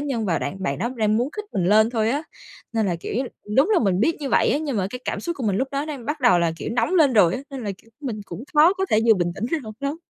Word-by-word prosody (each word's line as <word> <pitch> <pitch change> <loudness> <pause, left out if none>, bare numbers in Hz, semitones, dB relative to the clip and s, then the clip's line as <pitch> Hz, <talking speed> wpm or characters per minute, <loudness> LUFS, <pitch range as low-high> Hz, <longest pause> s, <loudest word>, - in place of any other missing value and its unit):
nhân 265 -6 -2
và 170 - +1
đạn 190 0 -5
bạn 140 -6 -1
đó 235 +6 -1
đang 215 -1 +2
muốn 245 +5 0
khích 425 0 -5
mình 185 - 0
lên 215 +4 +4
thôi 225 -2 +1
á. 285 +4 -1 0.5
Nên 225 -3 +1
là 175 - 0
kiểu - - -5 0.4
đúng 285 +10 +4
là 415 - +5
mình 195 -4 +1
biết 320 +9 +2
như 280 - -3
vậy - - +3
á - - +2
nhưng 295 -5 -3
mà 190 -2 0
cái 250 - -5
cảm - - -3
xúc 340 -1 -4
của 260 - -4
mình 195 -2 +1
lúc 265 +3 -1
đó 280 +1 -1
đang 275 -6 -7
bắt 295 0 -3
đầu 240 -8 +5
là, 170 -1 +1
kiểu, - - -5
nóng 245 +9 +1
lên 305 -7 +5
rồi 185 -6 +5
á, - - -4
nên 265 -4 -6
là, 205 - -2
kiểu, 225 - -23
mình 240 -7 -4
cũng 180 +8 -8
khó 310 +4 +6
có 385 0 -1
thể 215 - +4
vừa 225 - +7
bình 175 -3 -1
tĩnh 195 - -4
ngay 330 - 0
lúc 215 -1 -8
đó. 280 +2 -2
235 Hz, 320 wpm, -23 LUFS, 205-285 Hz, 0.5 s, vừa